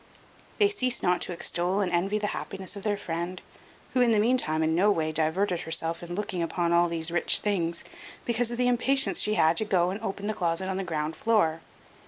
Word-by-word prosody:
They 410 - +5
ceased 255 - -2
not 180 0 +2
to - - -4
extol 175 +2 -1
and 190 -3 0
envy 190 +4 +1
the 210 - -2
happiness 190 -1 -6
of 200 - -7
their 205 0 0
friend, 175 -1 -4 0.5
who 255 - +3
in 240 -2 +4
the 220 - +4
meantime 210 -9 +2
in 160 0 +1
no 190 +5 +4
way 160 -5 +1
diverted 165 +4 0
herself 165 +1 -2
in 175 0 -6
looking 205 -3 -3
upon 170 0 0
all 170 0 +4
these 165 0 0
rich 175 - +1
things, 170 -5 -1 0.4
because 235 0 0
of 240 - -4
the 250 0 +2
impatience 260 +3 +1
she 215 - +1
had 160 -2 +3
to - - +2
go 180 -3 +2
and 200 +3 -5
open 200 -2 -4
the 215 - -1
closet 175 -1 -1
on 190 - -2
the 195 - -2
ground 155 -2 -3
floor. 165 -8 +2
185 Hz, 220 wpm, -27 LUFS, 170-210 Hz, 0.5 s, They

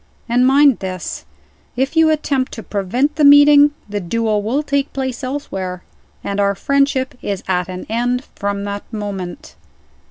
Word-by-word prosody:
And 245 +2 +3
mind 275 -1 +5
this, 185 -2 -5 0.5
if 265 +5 -1
you 320 -1 +5
attempt 280 -4 0
to 225 - -7
prevent 245 +10 -1
the 305 - +2
meeting, 290 0 +7 0.2
the 205 0 -3
duel 215 +3 -1
will 250 +8 -1
take 280 -1 -1
place 260 -1 -4
elsewhere 195 -10 -5 0.4
and 200 0 -3
our 200 0 +2
friendship 275 +3 0
is 200 -2 -4
at 180 -1 -1
an 185 0 -6
end 245 +3 -1
from 200 0 -3
that 200 +2 -6
moment." 200 -5 -6
240 Hz, 155 wpm, -18 LUFS, 200-280 Hz, 0.5 s, meeting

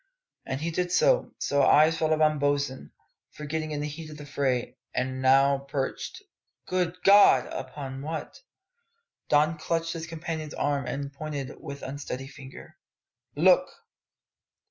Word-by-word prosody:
As 135 +1 -3
he 165 +2 -2
did 180 +2 -1
so, - - +3
his - - -3
eyes 150 +3 +5
fell 160 -1 0
upon 155 -1 +3
Bosin, 140 - -1 0.4
forgotten 155 +1 -4
in 150 -1 -3
the 150 - -2
heat 155 +1 -8
of 150 - -10
the 145 - -9
fray, 130 -3 -1 0.2
and 130 0 -2
now 135 +1 +4
perched 140 -1 -4 0.4
good 180 -1 -1
God! 200 -10 +7
upon 135 0 -6
what? 160 - -6 0.9
Don 155 +2 +3
clutched 165 +1 -1
his 165 -1 -6
companion's 160 -2 -5
arm 140 -2 -1
and 140 +2 -4
pointed 140 -2 -5
with 140 -2 -8
unsteady 135 -1 -5
finger. 135 -1 -12 0.6
"Look!" - - +4
145 Hz, 140 wpm, -27 LUFS, 135-160 Hz, 0.9 s, God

